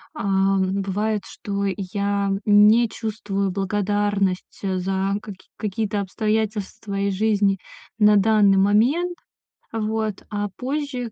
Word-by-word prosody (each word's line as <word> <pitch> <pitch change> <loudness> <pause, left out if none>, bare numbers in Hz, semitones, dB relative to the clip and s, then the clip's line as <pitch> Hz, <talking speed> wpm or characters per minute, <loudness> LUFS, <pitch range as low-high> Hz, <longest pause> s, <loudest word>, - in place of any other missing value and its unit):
Ам, 195 0 +1
бывает, 205 +2 -1
что 200 -1 -4
я 200 +1 -1 0.2
не 210 +3 +6
чувствую 205 -3 -3
благодарность, 200 0 -1
э, 190 -1 -1
за 195 +1 -1
каки 190 -3 -11
какие-то 210 0 -2
обстоятельства 215 0 -2
из 200 0 0
жизни 205 -2 +2 0.4
на 210 0 +6
данный 205 -1 +4
момент. 250 - +2 0.6
Вот, 220 -2 -2
а 205 0 -2
позже, 260 -3 -3
205 Hz, 110 wpm, -23 LUFS, 195-220 Hz, 0.6 s, не